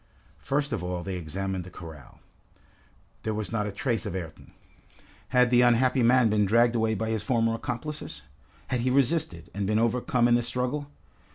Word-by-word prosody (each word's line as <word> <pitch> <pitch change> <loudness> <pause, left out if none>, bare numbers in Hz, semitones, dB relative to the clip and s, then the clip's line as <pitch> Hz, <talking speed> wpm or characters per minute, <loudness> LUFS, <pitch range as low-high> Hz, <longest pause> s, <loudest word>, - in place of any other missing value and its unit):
First 140 -1 -1
of 110 - -2
all 90 -1 -3
they 95 0 -4
examined 95 +2 -4
the 90 - -10
corral. 80 -7 -12 1.0
There 110 -1 -2
was 110 -1 -3
not 105 -2 -1
a - - -3
trace 115 +3 -1
of 100 -5 -5
Ayrton. 85 -4 -7 0.8
Had 125 -1 +3
the 125 0 +6
unhappy 125 +2 +3
man 125 0 +5
been 105 -1 +2
dragged 115 +3 +4
away 110 -1 +1
by 110 +2 -2
his 110 -2 -1
former 115 0 +1
accomplices? 125 +6 -5 0.5
Had 125 - 0
he 125 +2 0
resisted, 140 +5 0
and 100 -1 -2
been 105 +1 +1
overcome 120 +1 +2
in 120 - +3
the 120 - +4
struggle? 125 +4 -2
115 Hz, 180 wpm, -27 LUFS, 100-125 Hz, 1.0 s, the